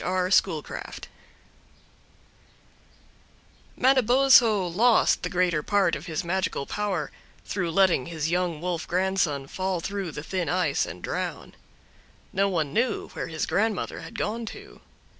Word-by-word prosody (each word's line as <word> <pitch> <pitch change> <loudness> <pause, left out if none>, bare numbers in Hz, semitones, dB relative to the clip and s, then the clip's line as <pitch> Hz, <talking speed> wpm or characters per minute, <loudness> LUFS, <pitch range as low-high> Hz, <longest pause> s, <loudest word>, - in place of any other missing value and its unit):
R. 185 0 0
Schoolcraft 165 -6 -1 2.7
Manabozho 250 -5 +5
lost 220 +7 +3
the - - -3
greater 180 -4 +1
part 195 -2 +2
of 145 +6 -8
his 165 +3 -3
magical 180 -5 -1
power 190 -7 -2 0.3
through 180 -4 -2
letting 175 -6 +3
his 160 -1 -3
young 175 -3 -1
wolf 175 -2 -3
grandson 180 -6 0
fall 185 +5 -2
through 195 +1 -4
the 150 - -7
thin 185 0 -2
ice 170 -5 +1
and 85 +2 -9
drown. - - -4 0.8
No 195 +1 +2
one 155 -6 -1
knew 240 +2 0
where - - -5
his 160 -1 -2
grandmother 215 -1 -1
had - - -9
gone 225 +2 -2
to. 410 - -10
185 Hz, 130 wpm, -26 LUFS, 165-205 Hz, 2.7 s, Manabozho